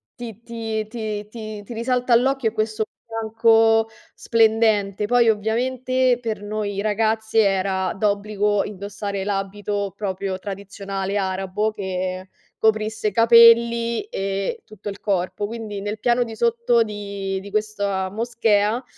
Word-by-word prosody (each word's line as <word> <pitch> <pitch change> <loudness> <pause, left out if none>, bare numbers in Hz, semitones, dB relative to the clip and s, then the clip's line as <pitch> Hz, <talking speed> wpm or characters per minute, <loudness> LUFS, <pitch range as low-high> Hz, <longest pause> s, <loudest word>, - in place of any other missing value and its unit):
ti 230 -3 -8
ti 225 -2 -4
ti 215 -2 -5
ti 215 -2 -7
ti 235 - -9
risalta 250 +1 0
all'occhio 255 0 +3
è - - -17
questo 215 0 -1 0.2
bianco 225 0 +3 0.3
splendente. 220 -3 +2
Poi, 240 +1 +4
ovviamente 250 +4 +1
per 225 -4 -4
noi 205 -1 -3
ragazze 220 +1 +1
era 190 -1 0
d'obbligo 205 0 0
indossare 200 0 -5
l'abito 200 0 -3
proprio 190 -2 -3
tradizionale 195 0 -4
arabo 190 +2 -1
che 185 -2 -4 0.3
coprisse 215 0 +1
capelli 230 +1 +5
e 195 - -3
tutto 210 -1 -8
il 200 - -8
corpo. 195 0 -1
Quindi 215 -2 -6
nel 210 +1 -4
piano 245 0 +2
di 225 -2 -8
sotto 235 +1 +2
di 200 -2 -3
di 200 +1 -10
questa 200 -3 -1
moschea 225 +1 +1
215 Hz, 125 wpm, -22 LUFS, 200-230 Hz, 0.3 s, capelli